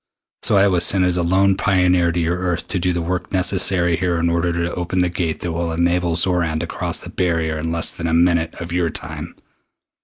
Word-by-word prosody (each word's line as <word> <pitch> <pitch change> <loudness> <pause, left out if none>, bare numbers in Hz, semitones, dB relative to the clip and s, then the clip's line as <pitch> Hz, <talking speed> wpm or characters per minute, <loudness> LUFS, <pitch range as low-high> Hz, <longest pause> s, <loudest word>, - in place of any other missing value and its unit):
So 100 - +2
I 100 +1 +5
was 90 -3 +3
sent 95 +1 +4
as 90 -1 +1
a 90 - +1
lone 95 +3 +2
pioneer 90 -3 +2
to 85 - -2
your 85 +1 0
Earth 90 -2 -2
to 95 - -1
do 90 +1 0
the 85 -1 -2
work 90 +2 -3
necessary 90 -2 +2
here 90 -1 -1
in 85 0 0
order 85 +1 0
to 85 0 -2
open 90 +1 -2
the 90 - +1
Gate 85 -2 -3
that 85 - -3
will 85 0 -2
enable 85 +1 0
Xoran 85 -2 0
to - - -2
cross - - -2
the - - -9
barrier 80 -3 -1
in 80 +1 -3
less 85 -1 +2
than 85 - -4
a 80 - -1
minute 85 -1 +2
of 85 0 -8
your 85 -1 0
time. - - -6
85 Hz, 235 wpm, -19 LUFS, 85-90 Hz, -, I